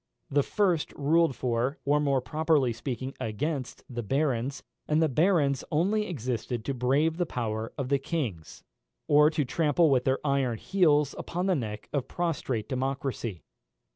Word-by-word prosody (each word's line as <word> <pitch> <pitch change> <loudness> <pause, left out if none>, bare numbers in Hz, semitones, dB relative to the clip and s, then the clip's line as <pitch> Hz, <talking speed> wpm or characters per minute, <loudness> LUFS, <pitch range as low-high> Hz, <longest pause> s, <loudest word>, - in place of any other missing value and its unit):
The 145 +1 +4
first 180 0 +1
ruled 160 0 +2
for, 125 +4 -1
or 145 +1 +3
more 140 -3 +2
properly 150 -2 +1
speaking 130 +2 -4
against, 130 +4 -3
the 120 -2 -4
barons, 135 +1 -1 0.2
and 150 +1 +2
the 160 - +4
barons 150 -2 +2
only 205 +7 +1
existed 125 - -3
to 140 - -1
brave 140 +6 +1
the 175 - +1
power 110 -3 -3
of 135 -3 -3
the 140 -1 +2
kings, 125 - -4 0.4
or 150 +1 +6
to 155 -3 -1
trample 155 +2 +2
with 125 -2 +2
their 130 0 +2
iron 135 -5 +1
heels 150 - +2
upon 180 +2 -3
the 190 - +3
neck 110 -8 -4
of 140 -4 -1
prostrate 135 -10 -2
democracy. 130 - -3
140 Hz, 155 wpm, -28 LUFS, 125-155 Hz, 0.4 s, or